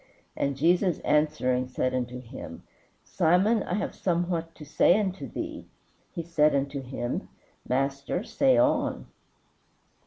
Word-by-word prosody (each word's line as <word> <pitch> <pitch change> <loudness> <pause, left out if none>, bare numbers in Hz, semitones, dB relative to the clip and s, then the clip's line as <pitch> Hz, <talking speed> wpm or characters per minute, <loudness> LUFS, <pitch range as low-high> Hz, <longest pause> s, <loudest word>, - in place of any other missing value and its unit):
And 140 0 -1
Jesus 175 +4 +3
answering 150 -4 +1
said 130 0 -1
unto 125 0 -3
him, 115 - -9 0.4
Simon, 190 +6 +2
I 180 - -2
have 210 - -2
somewhat 170 -2 -1
to 150 - -11
say 175 +6 +4
unto 195 -2 -3
thee. - - -6 0.4
He 170 - -5
said 155 -3 +3
unto 140 0 -1
him, 125 -2 -4 0.4
Master, 140 +7 -1
say 260 +3 +2
on. 300 0 +1
155 Hz, 125 wpm, -27 LUFS, 135-180 Hz, 0.4 s, say